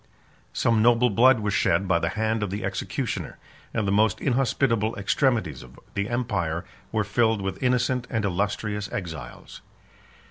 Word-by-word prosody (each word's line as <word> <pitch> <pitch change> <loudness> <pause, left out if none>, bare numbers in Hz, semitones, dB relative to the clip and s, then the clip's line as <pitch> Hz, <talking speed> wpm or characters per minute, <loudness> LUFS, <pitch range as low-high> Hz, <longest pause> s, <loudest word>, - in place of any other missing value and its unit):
Some 115 -2 +2
noble 120 +1 +4
blood 120 +3 +5
was 105 -1 -1
shed 95 +4 +2
by 85 -2 +3
the - - -1
hand 110 +3 -1
of 105 - -1
the 100 +2 -4
executioner; - - -3 0.3
and 110 -3 -1
the - - +1
most 105 0 +3
inhospitable 120 -4 +1
extremities 100 - 0
of 65 +1 -14
the 100 +1 -2
empire 95 -9 -1 0.3
were 110 -1 +1
filled 110 +1 +1
with 95 -1 -4
innocent 125 0 +1
and 110 -4 -1
illustrious 105 +2 -2
exiles. 80 -6 -7
105 Hz, 150 wpm, -25 LUFS, 95-120 Hz, 0.3 s, blood